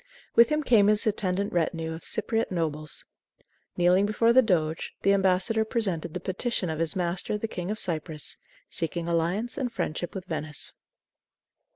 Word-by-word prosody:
With 235 Hz, -, +7 dB
him 305 Hz, 0 st, +1 dB
came 220 Hz, -7 st, +5 dB
his 210 Hz, 0 st, +3 dB
attendant 200 Hz, -2 st, 0 dB
retinue 165 Hz, -1 st, -1 dB
of 160 Hz, -, -8 dB
Cypriote 225 Hz, 0 st, +1 dB
nobles. 155 Hz, -4 st, -3 dB, 0.7 s
Kneeling 180 Hz, +3 st, +4 dB
before 230 Hz, +2 st, +3 dB
the 260 Hz, -, +8 dB
doge, 165 Hz, -8 st, 0 dB
the 195 Hz, -, +5 dB
ambassador 195 Hz, +3 st, +2 dB
presented 185 Hz, -8 st, -2 dB
the -, -, -1 dB
petition 190 Hz, 0 st, -2 dB
of 155 Hz, -, -4 dB
his 165 Hz, -1 st, +1 dB
master, 180 Hz, +3 st, -1 dB
the 225 Hz, -, -3 dB
King 180 Hz, -3 st, -5 dB
of 215 Hz, -, -2 dB
Cyprus, 160 Hz, -5 st, -2 dB, 0.3 s
seeking 170 Hz, +1 st, -2 dB
alliance 175 Hz, -, -1 dB
and 250 Hz, -3 st, -1 dB
friendship 175 Hz, 0 st, -3 dB
with 190 Hz, -1 st, -5 dB
Venice. 155 Hz, -3 st, -3 dB
180 Hz, 160 wpm, -27 LUFS, 165-215 Hz, 0.7 s, the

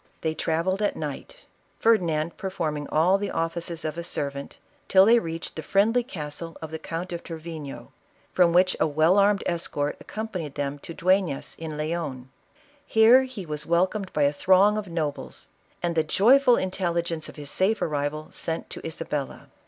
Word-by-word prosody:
They 160 Hz, -1 st, 0 dB
trav 160 Hz, +1 st, -1 dB
elled 190 Hz, +2 st, 0 dB
at 205 Hz, -, +1 dB
night, -, -, -6 dB, 0.4 s
Ferdinand 170 Hz, -8 st, +2 dB
performing 155 Hz, -6 st, -3 dB
all 180 Hz, +5 st, +3 dB
the 205 Hz, 0 st, -2 dB
offices 165 Hz, 0 st, -2 dB
of 155 Hz, +2 st, -3 dB
a -, -, -4 dB
servant, 140 Hz, -4 st, -4 dB, 0.3 s
till 190 Hz, 0 st, +6 dB
they 235 Hz, +2 st, +6 dB
reached 165 Hz, -4 st, -6 dB
the 160 Hz, -, -4 dB
friendly 205 Hz, +9 st, +2 dB
castle 165 Hz, -, -7 dB
of 160 Hz, -1 st, -7 dB
the 160 Hz, -, -5 dB
Count 170 Hz, +3 st, -5 dB
of 170 Hz, -, -4 dB
Trevino, 160 Hz, -3 st, -8 dB, 0.4 s
from 175 Hz, -2 st, +4 dB
which 180 Hz, +1 st, +4 dB
a -, -, +3 dB
well 155 Hz, +6 st, +3 dB
armed 200 Hz, 0 st, +3 dB
escort 150 Hz, -4 st, -1 dB
ac -, -, -15 dB
companied 185 Hz, -9 st, -5 dB
Jhem 145 Hz, 0 st, -3 dB
to 165 Hz, -, -9 dB
Duefias 185 Hz, -5 st, +1 dB
in 160 Hz, -2 st, -5 dB
Leon. 150 Hz, -5 st, -4 dB, 0.5 s
Here 235 Hz, +3 st, +6 dB
he 245 Hz, -8 st, -7 dB
was 150 Hz, -1 st, -3 dB
welcomed 185 Hz, +3 st, +1 dB
by 150 Hz, -, +1 dB
a 140 Hz, +1 st, +3 dB
throng 190 Hz, +6 st, +4 dB
of 210 Hz, -3 st, -4 dB
nobles, 155 Hz, -4 st, -4 dB, 0.3 s
and 175 Hz, -1 st, 0 dB
the 160 Hz, -1 st, +2 dB
joyful 245 Hz, -, +5 dB
intelli 185 Hz, -3 st, -1 dB
gence 165 Hz, -2 st, -4 dB
of -, -, -12 dB
his 145 Hz, -2 st, -7 dB
safe 205 Hz, +3 st, +1 dB
arrival 150 Hz, 0 st, -2 dB
sent 165 Hz, 0 st, -3 dB
to -, -, -7 dB
Isabella. 150 Hz, -3 st, -5 dB
170 Hz, 175 wpm, -25 LUFS, 155-190 Hz, 0.5 s, till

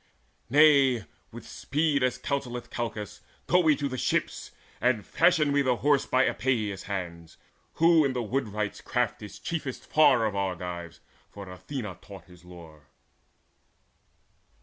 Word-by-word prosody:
Nay, 140 Hz, -5 st, +5 dB, 0.3 s
with -, -, -11 dB
speed, 150 Hz, 0 st, -1 dB
As 130 Hz, -1 st, +1 dB
counselleth 125 Hz, -4 st, -4 dB
Calchas, 110 Hz, -4 st, -5 dB, 0.2 s
go 180 Hz, -, +3 dB
we 160 Hz, -4 st, +4 dB
to 140 Hz, 0 st, -2 dB
the 130 Hz, -2 st, -5 dB
ships, -, -, -1 dB, 0.3 s
And 120 Hz, -3 st, +1 dB
fashion 165 Hz, -4 st, +3 dB
we 145 Hz, 0 st, +3 dB
the 130 Hz, -2 st, +1 dB
Horse 145 Hz, +2 st, +1 dB
by 130 Hz, +1 st, +3 dB
Epeius' 110 Hz, -7 st, -1 dB
hands, 85 Hz, -4 st, -6 dB, 0.4 s
Who 165 Hz, -1 st, +4 dB
in 135 Hz, -2 st, 0 dB
the 125 Hz, -1 st, -2 dB
woodwright's 105 Hz, -3 st, -3 dB
craft 125 Hz, -3 st, -2 dB
is 105 Hz, -, -9 dB
chiefest 150 Hz, -6 st, -5 dB
far 130 Hz, -7 st, +4 dB
Of 105 Hz, -2 st, -2 dB
Argives, 90 Hz, -3 st, -4 dB, 0.3 s
for 100 Hz, -1 st, -10 dB
Athena 95 Hz, +2 st, -7 dB
taught 100 Hz, -2 st, -12 dB
his 90 Hz, -1 st, -18 dB
lore." 80 Hz, -5 st, -14 dB
120 Hz, 140 wpm, -27 LUFS, 100-140 Hz, 0.4 s, Nay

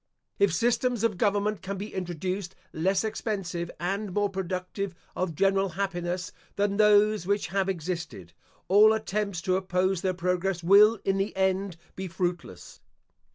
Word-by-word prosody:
If 200 Hz, -2 st, +4 dB
systems 240 Hz, +4 st, +1 dB
of 210 Hz, -5 st, 0 dB
government 205 Hz, 0 st, +1 dB
can 195 Hz, +1 st, -5 dB
be 205 Hz, +3 st, -6 dB
introduced 185 Hz, +1 st, -4 dB, 0.2 s
less 190 Hz, +5 st, +1 dB
expensive 195 Hz, -6 st, -3 dB
and 195 Hz, +3 st, -2 dB
more 205 Hz, +1 st, 0 dB
productive 185 Hz, 0 st, -4 dB, 0.2 s
of 180 Hz, -3 st, -2 dB
general 195 Hz, +2 st, +2 dB
happiness 175 Hz, -1 st, -3 dB, 0.2 s
than 200 Hz, 0 st, 0 dB
those 210 Hz, -2 st, +4 dB
which 200 Hz, 0 st, 0 dB
have 195 Hz, 0 st, 0 dB
existed, 165 Hz, -, -5 dB, 0.3 s
all 210 Hz, +3 st, +6 dB
attempts 205 Hz, -4 st, -2 dB
to 185 Hz, -1 st, +2 dB
oppose 185 Hz, -1 st, 0 dB
their 185 Hz, -1 st, 0 dB
progress 180 Hz, 0 st, -1 dB
will 210 Hz, +5 st, +7 dB
in 195 Hz, 0 st, +1 dB
the 195 Hz, +2 st, -2 dB
end 190 Hz, -1 st, 0 dB, 0.2 s
be 190 Hz, 0 st, -5 dB
fruitless. 175 Hz, -, -4 dB
190 Hz, 145 wpm, -27 LUFS, 180-205 Hz, 0.3 s, will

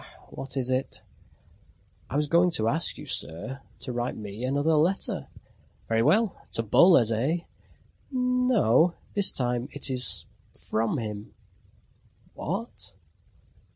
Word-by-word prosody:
What 135 Hz, +1 st, -7 dB
is 130 Hz, -1 st, -1 dB
it?" 130 Hz, +1 st, -2 dB, 1.1 s
"I -, -, -5 dB
was 150 Hz, +1 st, +2 dB
going 170 Hz, +4 st, +4 dB
to 110 Hz, -7 st, +1 dB
ask 160 Hz, +8 st, +2 dB
you, -, -, -9 dB
sir, 130 Hz, -, -4 dB, 0.2 s
to 125 Hz, -, -5 dB
write 120 Hz, +1 st, -2 dB
me 105 Hz, +1 st, -7 dB
another 145 Hz, +5 st, +1 dB
letter." 165 Hz, +6 st, +1 dB, 0.6 s
"Very 115 Hz, 0 st, +2 dB
well! 195 Hz, -, +3 dB, 0.2 s
To 115 Hz, -, 0 dB
Boles, 120 Hz, -, +5 dB
eh?" 135 Hz, +10 st, 0 dB, 0.7 s
"No, 250 Hz, -, +3 dB, 0.2 s
this 200 Hz, -1 st, +3 dB
time 125 Hz, -1 st, -1 dB
it 145 Hz, -1 st, -2 dB
is 125 Hz, -1 st, +2 dB, 0.3 s
from 115 Hz, +6 st, -1 dB
him." 105 Hz, -3 st, -6 dB, 1.0 s
"Wha 195 Hz, +8 st, -3 dB
at?" 235 Hz, -, -6 dB
135 Hz, 125 wpm, -27 LUFS, 115-175 Hz, 1.1 s, Boles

